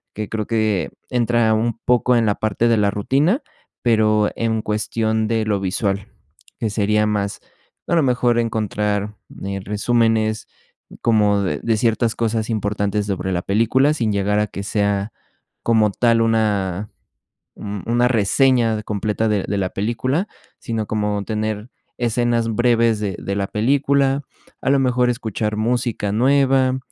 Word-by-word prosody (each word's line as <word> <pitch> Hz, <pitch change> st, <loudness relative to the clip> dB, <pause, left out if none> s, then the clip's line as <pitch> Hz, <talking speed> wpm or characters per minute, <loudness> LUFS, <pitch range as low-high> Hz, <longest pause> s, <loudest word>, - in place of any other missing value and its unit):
que 105 Hz, -1 st, -4 dB
creo 110 Hz, -2 st, -3 dB
que 110 Hz, -4 st, 0 dB, 0.2 s
entra 120 Hz, -2 st, +2 dB
un 115 Hz, +1 st, 0 dB
poco 125 Hz, 0 st, +3 dB
en 115 Hz, -1 st, +3 dB
la 105 Hz, -, +2 dB
parte 110 Hz, +2 st, 0 dB
de 115 Hz, -1 st, +3 dB
la 100 Hz, -1 st, +2 dB
rutina, 140 Hz, -, +1 dB, 0.4 s
pero 110 Hz, -2 st, +3 dB
en 110 Hz, -1 st, -1 dB
cuestión 110 Hz, +1 st, -1 dB
de 110 Hz, -1 st, 0 dB
lo 105 Hz, -2 st, 0 dB
visual, 95 Hz, +1 st, -2 dB, 0.5 s
que 110 Hz, -, -1 dB
sería 105 Hz, +1 st, +1 dB
más, 100 Hz, -1 st, -2 dB, 0.5 s
a 170 Hz, -, +1 dB
lo 165 Hz, -, +3 dB
mejor, 125 Hz, -2 st, +2 dB
encontrar, 105 Hz, -2 st, -1 dB, 0.3 s
eh, 100 Hz, 0 st, -3 dB
resúmenes 110 Hz, +1 st, +1 dB, 0.5 s
como 105 Hz, -3 st, +3 dB
de 95 Hz, -, -1 dB
de 115 Hz, -2 st, +1 dB
ciertas 115 Hz, 0 st, +1 dB
cosas 110 Hz, -1 st, -1 dB
importantes 105 Hz, -1 st, -1 dB
sobre 95 Hz, -1 st, -2 dB
la 90 Hz, -1 st, -1 dB
película, 120 Hz, +8 st, +2 dB
sin 115 Hz, -8 st, -1 dB
llegar 100 Hz, +1 st, +1 dB
a 105 Hz, -, +1 dB
que 100 Hz, 0 st, -7 dB
sea, 100 Hz, 0 st, -1 dB, 0.5 s
como 110 Hz, -3 st, +3 dB
tal, 115 Hz, +2 st, +2 dB
una 105 Hz, -3 st, 0 dB, 0.7 s
un 100 Hz, -2 st, -6 dB
una 120 Hz, +2 st, +2 dB
reseña 120 Hz, +1 st, +2 dB
de 105 Hz, -, -6 dB
completa 105 Hz, +2 st, -1 dB
de 105 Hz, -3 st, 0 dB
de 100 Hz, -, -1 dB
la 95 Hz, -2 st, -1 dB
película, 120 Hz, -, -1 dB, 0.3 s
sino 115 Hz, -2 st, -3 dB
como 105 Hz, -1 st, -1 dB
tener 110 Hz, 0 st, -3 dB, 0.3 s
escenas 120 Hz, -1 st, +1 dB
breves 115 Hz, -1 st, +2 dB
de 100 Hz, -4 st, -2 dB
de 100 Hz, -, -4 dB
la 100 Hz, -1 st, -1 dB
película, 140 Hz, +4 st, +1 dB, 0.4 s
a -, -, 0 dB
lo 140 Hz, -, +4 dB
mejor 125 Hz, -1 st, +2 dB
escuchar 110 Hz, -2 st, -2 dB
música 115 Hz, -2 st, -1 dB
nueva, 130 Hz, +2 st, +3 dB
110 Hz, 150 wpm, -20 LUFS, 105-120 Hz, 0.7 s, lo